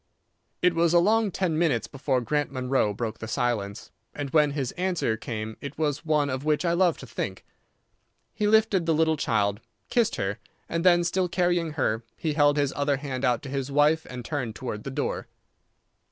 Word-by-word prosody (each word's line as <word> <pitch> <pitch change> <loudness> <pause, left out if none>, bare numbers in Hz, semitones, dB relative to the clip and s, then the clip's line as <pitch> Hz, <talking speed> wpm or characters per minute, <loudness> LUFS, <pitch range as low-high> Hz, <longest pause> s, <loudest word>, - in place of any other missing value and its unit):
It 180 -1 +5
was 165 0 +2
a - - +8
long 215 +4 +3
ten 175 -4 -1
minutes 150 -9 +2
before 135 -2 -1
Grant 145 +5 -1
Munro 130 -4 +1
broke 110 +2 -4
the 110 - -6
silence, 110 -4 -2 0.2
and 145 -2 -4
when 150 -2 +4
his 135 -4 -2
answer 180 -10 0
came 110 -1 -5
it 140 0 -7
was 150 -1 -1
one 155 -3 +2
of 130 0 -3
which 155 +3 +1
I 170 - +2
love 175 -2 +3
to - - -8
think. 100 -5 -5 0.9
He 210 - 0
lifted 210 -5 +3
the 165 - +3
little 160 0 +3
child, 100 -7 0 0.3
kissed 230 -2 +2
her, 100 +1 -2 0.3
and 165 0 -2
then, 175 -1 +5
still 180 +1 0
carrying 175 -3 +1
her, 115 -6 0
he 155 -2 -1
held 145 -1 +4
his 140 -2 +1
other 145 -1 +1
hand 135 -2 -5
out 120 -2 +1
to 140 - -7
his 135 0 -3
wife 150 +3 +3
and 125 -2 -7
turned 125 -8 -3
towards 120 -5 -5
the - - -3
door. 135 - -3
145 Hz, 195 wpm, -26 LUFS, 125-170 Hz, 0.9 s, a